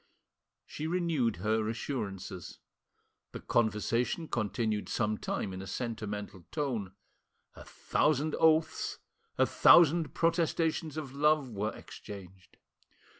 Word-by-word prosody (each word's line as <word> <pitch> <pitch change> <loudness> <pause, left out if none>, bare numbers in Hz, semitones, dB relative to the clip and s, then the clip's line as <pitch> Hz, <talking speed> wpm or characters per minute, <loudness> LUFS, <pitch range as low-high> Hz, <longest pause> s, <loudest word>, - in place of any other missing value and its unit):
She 155 - -5
renewed 160 - +1
her 110 +4 0
assurances. 100 - -5 0.8
The - - -5
conversation 115 +7 0
continued 110 -1 -1
some 110 -2 0
time 95 - -3
in 95 - -6
a 95 - -8
sentimental 105 -5 -5
tone. 120 -11 -2 0.6
A - - -12
thousand 150 +1 0
oaths, 160 0 +2 0.4
a - - +5
thousand 165 -2 +5
protestations 165 -2 0
of 140 -4 -5
love 150 -2 +2
were, 105 +1 -2
exchanged. 95 -2 -11
120 Hz, 105 wpm, -31 LUFS, 105-155 Hz, 0.8 s, a